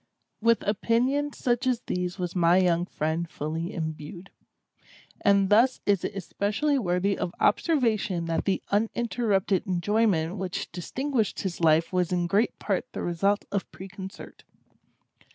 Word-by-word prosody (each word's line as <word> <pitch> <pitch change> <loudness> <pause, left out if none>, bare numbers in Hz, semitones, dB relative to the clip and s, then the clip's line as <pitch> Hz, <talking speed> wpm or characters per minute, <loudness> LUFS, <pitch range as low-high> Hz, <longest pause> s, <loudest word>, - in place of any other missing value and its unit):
With 230 -1 +2
opinions 255 +7 +1
such 245 +1 0
as 250 -2 +1
these 180 0 -3
was 180 -1 -4
my 175 0 +4
young 175 -1 +2
friend 160 +1 -2
fully 160 +5 -4
imbued; 160 +1 -6 0.9
and 200 -1 +4
thus 240 +5 +5
is 200 -3 +2
it - - -3
especially 210 - 0
worthy 190 -1 +1
of 175 - -4
observation 220 - +1
that 165 0 -1
the 195 - 0
uninterrupted 215 -2 0
enjoyment 185 -1 +1
which 185 -1 -4
distinguished 235 +6 -2
his 180 -3 -4
life 165 +2 +3
was 180 -1 +1
in 175 -1 +1
great 200 +6 +1
part - - -2
the - - -4
result 195 +4 +1
of 200 -1 -2
preconcert. 190 0 -10
195 Hz, 135 wpm, -27 LUFS, 175-225 Hz, 0.9 s, thus